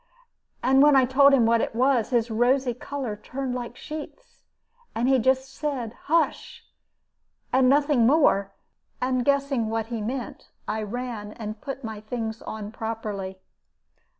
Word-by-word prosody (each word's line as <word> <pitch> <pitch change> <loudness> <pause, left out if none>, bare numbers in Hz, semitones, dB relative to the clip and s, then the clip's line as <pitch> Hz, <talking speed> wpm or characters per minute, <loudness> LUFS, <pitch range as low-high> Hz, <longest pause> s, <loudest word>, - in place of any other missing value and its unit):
And 265 +2 +5
when 295 0 +6
I 265 -1 +6
told 275 +2 +5
him 260 -4 +4
what 230 0 +3
it - - -3
was, 255 -2 +2
his 240 -2 +1
rosy 245 +3 +2
color 250 -2 -5
turned 260 +4 -5
like 245 -1 -5
sheets, 310 +11 -9 0.5
and 235 +3 +1
he 265 -1 +4
just 260 +2 +1
said, 265 -7 -3
'Hush!' 330 +2 0 0.9
and 260 -1 +5
nothing 285 -4 +4
more. 240 -9 +3 0.5
And 255 -1 0
guessing 275 -4 +1
what 225 0 -1
he 225 - -2
meant, 245 +2 -5 0.2
I 220 - -2
ran 215 -1 -5
and 215 -2 -7
put 275 -1 -6
my 220 -2 -6
things 220 0 -4
on 215 -1 -6
properly. 210 -4 -5
245 Hz, 150 wpm, -25 LUFS, 225-270 Hz, 0.9 s, when